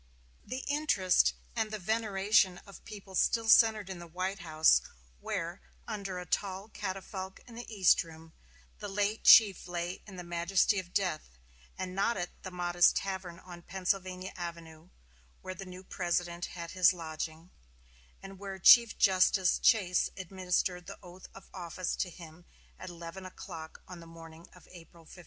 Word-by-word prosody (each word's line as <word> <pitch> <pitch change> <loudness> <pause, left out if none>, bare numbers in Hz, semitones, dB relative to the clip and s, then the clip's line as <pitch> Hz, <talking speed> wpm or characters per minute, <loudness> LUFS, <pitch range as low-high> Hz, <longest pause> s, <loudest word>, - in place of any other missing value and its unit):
The 255 +2 -6
interest 285 -11 +2 0.2
and 220 -2 -1
veneration 210 -2 +1
of 200 - -12
the - - -22
people 200 -3 -11
still 225 +4 +1
centered 220 -2 +5
in 190 -2 -7
the 170 - -10
White 185 +4 -3
House, 160 -1 +4 0.4
where, - - -4 0.3
under 195 -3 -5
a 180 - -6
tall 195 +3 -3
catafalque 190 -1 -6
in 240 - -14
the 235 0 -9
East 195 -5 +4
Room, 160 -1 -14 0.5
the - - -5
late 205 +2 -1
chief 200 -5 +7
lay 175 0 -4
in 195 - -10
the 180 - -7
majesty 175 +4 +1
of 175 -2 -9
death, 155 - -2 0.4
and 185 -1 -5
not 200 +4 0
at 175 -1 -3
the 185 - -7
modest 175 -1 +3
tavern 190 -3 -4
on 175 -1 -12
Pennsylvania 185 0 -3
Avenue, 170 -1 -8 0.5
where 185 - -6
the 190 +1 -9
new 185 0 -10
President 175 -1 -2
had 170 -1 -8
his 185 -1 +5
lodging, 160 0 -7 0.7
and 195 -1 -10
where 195 -1 -6
Chief 235 +4 +7
Justice 185 -1 +3
Chase 185 -6 +3
administered 180 -1 -2
the - - -8
oath 180 +1 -12
of 195 - -13
office 180 -1 -4
to 185 - -1
him 170 0 -13 0.3
at 185 - -8
eleven 170 +2 -9
o'clock 170 -3 -10
on 180 -1 -10
the 165 - -12
morning 165 0 -13
of 180 - -18
April 170 -1 -15
15. 180 - -14
185 Hz, 160 wpm, -31 LUFS, 175-195 Hz, 0.7 s, chief